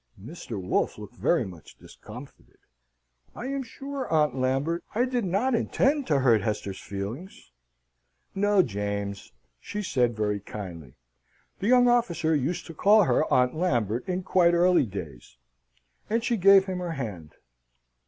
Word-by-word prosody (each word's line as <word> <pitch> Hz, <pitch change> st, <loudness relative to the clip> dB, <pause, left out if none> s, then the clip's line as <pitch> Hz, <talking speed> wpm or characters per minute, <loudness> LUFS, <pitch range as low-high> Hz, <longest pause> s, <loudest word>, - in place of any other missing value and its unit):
Mr. 115 Hz, -, -7 dB
Wolfe 90 Hz, 0 st, -1 dB
looked -, -, -10 dB
very -, -, +1 dB
much 90 Hz, -5 st, -12 dB
discomfited. -, -, -13 dB, 0.8 s
"I -, -, -6 dB
am 275 Hz, 0 st, -2 dB
sure, 270 Hz, +2 st, -6 dB
Aunt 150 Hz, -4 st, +3 dB
Lambert, 135 Hz, +6 st, -1 dB
I 240 Hz, +3 st, +3 dB
did 250 Hz, -2 st, -1 dB
not 200 Hz, +9 st, 0 dB
intend 275 Hz, +4 st, +1 dB
to 145 Hz, -5 st, +2 dB
hurt 115 Hz, -5 st, +4 dB
Hester's 105 Hz, -2 st, -3 dB
feelings." 100 Hz, -, -7 dB, 0.8 s
"No, 205 Hz, -1 st, +3 dB
James," 100 Hz, -, -4 dB, 0.3 s
she 210 Hz, -, -5 dB
said, 125 Hz, -, +1 dB
very 105 Hz, -1 st, 0 dB
kindly 85 Hz, -10 st, -9 dB, 0.6 s
the 200 Hz, -, -2 dB
young 245 Hz, 0 st, +5 dB
officer 205 Hz, -10 st, +2 dB
used 150 Hz, +4 st, -1 dB
to 165 Hz, -, -9 dB
call 205 Hz, +6 st, +5 dB
her 155 Hz, -, +1 dB
Aunt 125 Hz, 0 st, +3 dB
Lambert 120 Hz, -, -1 dB
in 185 Hz, 0 st, -2 dB
quite 175 Hz, -2 st, +3 dB
early 175 Hz, -6 st, +4 dB
days 75 Hz, -, -9 dB, 0.7 s
and 230 Hz, +2 st, 0 dB
she 240 Hz, 0 st, +1 dB
gave 195 Hz, -1 st, +6 dB
him 185 Hz, -2 st, -4 dB
her 175 Hz, -2 st, -3 dB
hand. 100 Hz, -, -6 dB
160 Hz, 145 wpm, -26 LUFS, -, 0.8 s, gave